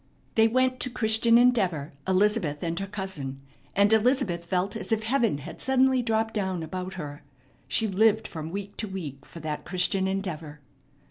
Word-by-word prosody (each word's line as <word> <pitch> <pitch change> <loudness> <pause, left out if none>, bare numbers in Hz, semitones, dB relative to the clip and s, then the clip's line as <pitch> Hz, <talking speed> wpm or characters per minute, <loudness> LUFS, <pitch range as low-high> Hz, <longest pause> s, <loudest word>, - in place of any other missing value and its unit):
They 225 0 +5
went 255 +2 +1
to - - 0
Christian 230 0 +3
Endeavor, 190 - +2
Elizabeth 190 -6 +1
and 170 0 -1
her 195 - -3
cousin; 190 -10 -5 0.4
and 200 +2 +4
Elizabeth 220 -7 +2
felt 185 +3 -1
as 225 - -6
if 220 -1 +1
heaven 230 - +1
had 140 - -9
suddenly 265 -1 +3
dropped 225 -1 0
down 190 -5 -1
about 185 +3 -5
her. 145 -4 -7 0.5
She 225 - +2
lived 220 +2 +3
from 160 -1 -6
week 200 +2 -6
to 215 - -2
week 160 -8 -7
for 165 - -10
that 150 -1 -4
Christian 190 +1 0
Endeavor. 165 -6 -4
195 Hz, 170 wpm, -27 LUFS, 170-225 Hz, 0.5 s, They